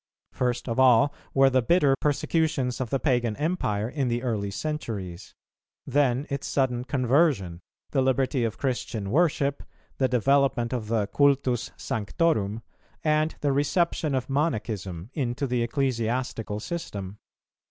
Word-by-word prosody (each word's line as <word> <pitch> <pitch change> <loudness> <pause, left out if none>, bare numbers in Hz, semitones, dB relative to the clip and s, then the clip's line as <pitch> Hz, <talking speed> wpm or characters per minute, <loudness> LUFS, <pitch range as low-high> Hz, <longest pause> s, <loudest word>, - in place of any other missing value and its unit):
First 125 0 -1
of 115 +1 -1
all 130 +2 +5 0.2
were 135 0 +4
the 130 0 +3
bitter 140 +1 +3
persecutions 145 -3 0
of 125 - -3
the 135 - 0
Pagan 120 -6 +1
Empire 115 - -1
in 135 +1 -2
the 120 +1 -1
early 105 -5 -1
centuries; 100 - -5 0.5
then 135 -1 +1
its 140 0 -3
sudden 125 -3 0
conversion, 130 - +1 0.3
the 135 - +2
liberty 130 -1 +1
of 115 -2 -2
Christian 120 -6 -2
worship, 145 -2 +2 0.4
the 130 - +3
development 130 -1 +2
of 115 -4 -3
the 110 -2 +1
cultus 135 0 +2
sanctorum, 110 -2 -1 0.4
and 155 0 +1
the 145 - +2
reception 145 +1 +1
of 130 - -2
Monachism 110 - -2
into 130 -1 -2
the 125 -2 0
ecclesiastical 115 -3 -1
system. 105 - -6
130 Hz, 130 wpm, -26 LUFS, 115-140 Hz, 0.5 s, all